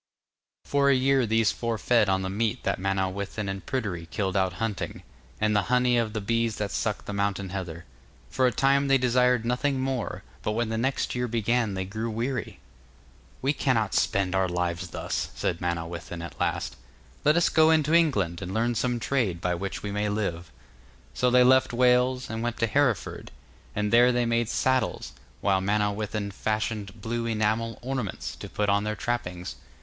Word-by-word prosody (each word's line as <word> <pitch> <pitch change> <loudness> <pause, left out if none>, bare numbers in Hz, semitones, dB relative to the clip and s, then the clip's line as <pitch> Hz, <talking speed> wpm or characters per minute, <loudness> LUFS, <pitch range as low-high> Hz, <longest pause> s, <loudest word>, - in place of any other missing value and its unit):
For 140 -1 +2
a 140 - +5
year 130 -1 +3
these 110 -1 +3
four 115 -1 -2
fed 115 -2 +3
on 95 0 +1
the 95 - -2
meat 115 +4 -1
that - - 0
Manawyddan 95 +2 -2
and 95 0 -4
Pryderi 100 -11 -3
killed 95 0 -2
out 95 -2 +2
hunting, 105 +2 -4 0.4
and 110 0 +2
the 105 - +4
honey 125 0 +3
of 115 -2 0
the 110 - -2
bees 115 +1 0
that 105 -1 -3
sucked 105 -2 -2
the 105 - -5
mountain 100 -1 -1
heather. 90 -3 -5 0.4
For 130 - +2
a - - +2
time 140 +3 +3
they 135 0 +5
desired 125 -1 +2
nothing 130 +3 0
more, 130 -3 -2 0.2
but 105 - -1
when 115 0 -1
the 110 - -1
next 130 +3 0
year 125 0 -1
began 115 -2 0
they 95 0 -2
grew 110 +4 -4
weary. 120 +1 -3 0.8
'We 140 +2 +2
cannot 115 -8 +1
spend 95 -2 +1
our 95 -1 +2
lives 90 0 -2
thus,' 85 - -3
said 85 - -2
Manawyddan 85 0 -4
at 85 - -9
last, 60 - -1 0.5
'let 150 +3 +4
us 170 - +4
go 160 0 +5
into 155 -1 +3
England 105 - +2
and 90 +3 -5
learn 120 +2 +1
some 120 +1 0
trade 115 -9 0
by 90 0 0
which 95 +3 -4
we 105 - -3
may 105 +1 -1
live.' 90 -6 -3 0.6
So 125 - +2
they 125 0 +6
left 130 0 +4
Wales, 125 +1 +3
and 110 0 -4
went 120 -1 -2
to 115 - +2
Hereford, 120 -1 0 0.5
and 105 +1 -1
there 120 +1 +7
they 120 -1 +1
made 115 -1 +1
saddles, 130 0 0 0.3
while 95 -1 +2
Manawyddan 105 +1 -1
fashioned 110 0 -3
blue 115 +1 -2
enamel 110 0 0
ornaments 125 -6 -3
to - - -8
put 105 - -1
on 100 0 +2
their 105 0 -2
trappings. 90 -7 -3
110 Hz, 185 wpm, -27 LUFS, 100-125 Hz, 0.8 s, there